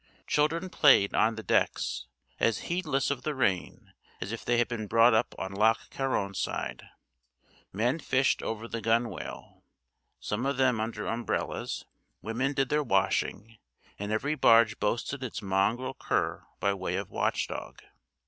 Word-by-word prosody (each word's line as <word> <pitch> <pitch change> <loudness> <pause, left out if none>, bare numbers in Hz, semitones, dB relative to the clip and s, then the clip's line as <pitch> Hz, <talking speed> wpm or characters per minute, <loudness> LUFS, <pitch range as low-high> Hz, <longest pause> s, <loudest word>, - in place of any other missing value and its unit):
Children 165 +5 +1
played 130 - +5
on 115 +1 +3
the 110 - -7
decks, - - 0 0.3
as 115 - +2
heedless 155 -7 0
of 135 -3 -2
the 150 +2 -3
rain 95 - -1 0.3
as 95 - -4
if 115 - -5
they 120 - +1
had 120 - +3
been 115 -3 -4
brought 115 +2 +5
up 110 - +1
on 95 - -4
Loch 110 +3 +2
Carron 130 -7 -1
side; - - -4 0.8
men 120 - 0
fished 135 -3 +1
over 115 +1 -4
the 115 -1 -4
gunwale, 115 +2 -2 0.6
some 115 +6 -2
of 140 -1 -1
them 130 -4 +3
under 110 -1 -3
umbrellas; 115 -1 -3 0.3
women 120 +7 -1
did 135 -2 0
their 150 0 +2
washing; 105 -1 0 0.4
and 105 +1 -3
every 140 +8 0
barge 115 -6 +5
boasted 120 +5 -1
its 115 -4 -5
mongrel 105 +7 0
cur - - -2
by 100 0 +2
way 95 -2 -3
of 100 0 -4
watch - - 0
dog. - - -7
115 Hz, 155 wpm, -29 LUFS, 105-130 Hz, 0.8 s, played